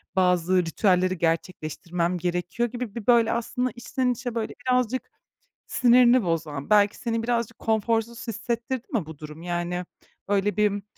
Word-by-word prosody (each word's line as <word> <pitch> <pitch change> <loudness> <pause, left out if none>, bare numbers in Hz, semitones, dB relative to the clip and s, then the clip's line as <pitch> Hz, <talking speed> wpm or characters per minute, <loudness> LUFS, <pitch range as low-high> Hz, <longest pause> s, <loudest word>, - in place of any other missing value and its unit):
bazı 180 -1 +3
ritüelleri 185 +1 +2
gerçekleştirmem 170 +1 -1
gerekiyor?" 180 +6 -1
gibi 240 -3 -6
bir, 230 -3 -6
böyle, 235 -2 +5
aslında 245 +2 -1
içten 250 +2 -1
içe, 245 0 -4
böyle, 225 -1 -2
birazcık 250 0 +1 0.6
sinirini 245 -1 +5
bozan, 160 -5 -2
belki 205 -1 +4
seni 230 -2 -2
birazcık 235 -1 -1
konforsuz 225 +2 0
hissettirdi 235 +2 -3
mi 215 -9 0
bu 160 -1 -10
durum? 150 +1 -9
Yani, 175 +1 -2 0.4
öyle 205 +1 +1
bir, 205 -1 +1
210 Hz, 135 wpm, -25 LUFS, 175-235 Hz, 0.6 s, böyle